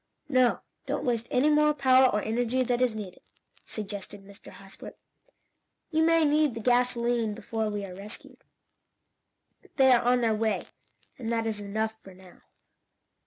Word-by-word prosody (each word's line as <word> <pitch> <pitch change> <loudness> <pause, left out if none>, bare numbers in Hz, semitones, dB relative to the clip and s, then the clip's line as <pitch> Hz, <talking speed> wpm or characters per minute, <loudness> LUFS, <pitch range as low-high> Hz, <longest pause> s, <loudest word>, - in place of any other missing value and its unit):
"No, 255 -3 +3 0.3
don't - - -2
waste 235 -2 -1
any 275 +5 +2
more 300 0 +3
power 260 -2 +5
or 210 -2 -1
energy 245 +3 0
than 245 0 -1
is 245 -3 +1
needed," 200 -4 -8 0.4
suggested 205 -1 -7
Mr. 200 +1 -14
Hosbrook. 195 0 -12 0.9
"You 315 0 +2
may 330 0 +4
need 295 -3 +2
the - - -5
gasolene 240 -2 +1
before 220 0 -3
we 205 -1 -4
are 185 - -9
rescued. 200 +4 -9 1.3
They 265 -1 +5
are 245 -1 +5
on 245 +1 +2
their 225 -2 +2
way, 220 0 -1 0.6
and 235 -2 -4
that 230 -1 0
is 220 -2 -2
enough 220 +2 -3
for 190 -1 -14
now." 185 -1 -17
230 Hz, 155 wpm, -27 LUFS, 210-255 Hz, 1.3 s, power